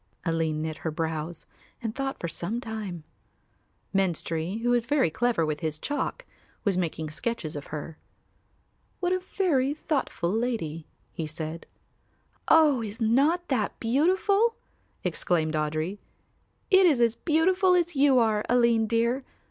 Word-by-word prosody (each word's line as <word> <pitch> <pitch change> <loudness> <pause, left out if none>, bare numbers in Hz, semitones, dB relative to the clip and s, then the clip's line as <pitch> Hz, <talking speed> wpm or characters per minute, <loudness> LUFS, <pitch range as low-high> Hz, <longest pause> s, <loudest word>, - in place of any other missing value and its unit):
Aline 160 -2 0
knit 160 -1 -4
her 160 - -3
brows 160 +1 -3 0.3
and 225 -3 -3
thought 270 +1 -3
for 170 - -3
some 195 +7 -3
time. 215 -8 -6 0.9
Menstrie, 180 +1 -1
who 245 - +2
was 240 -1 +2
very 270 - +2
clever 235 -5 +1
with 155 -1 -2
his 155 -2 -2
chalk, 290 - -3 0.4
was 200 -3 +1
making 160 -3 -2
sketches 175 -3 -3
of 145 - -6
her. 155 +1 -7 1.0
"What 360 0 +1
a 370 - +1
very 305 -8 0
thoughtful 270 - -1
lady!" 205 -9 -2 0.2
he 160 -3 -4
said. 155 +1 -6 0.8
"Oh, 300 -6 +5
is 215 +1 -6
not 285 +10 +2
that 230 -7 -1
beautiful?" 380 - +2 0.5
exclaimed 160 -3 0
Audry. 155 +5 -1 0.7
"It 380 -1 +7
is 290 -7 +3
as 235 -2 +4
beautiful 365 - +3
as 350 -2 +1
you 275 -1 +5
are, 220 -3 +3
Aline 235 -2 +4
dear. 235 +4 +1
225 Hz, 140 wpm, -27 LUFS, -, 1.0 s, It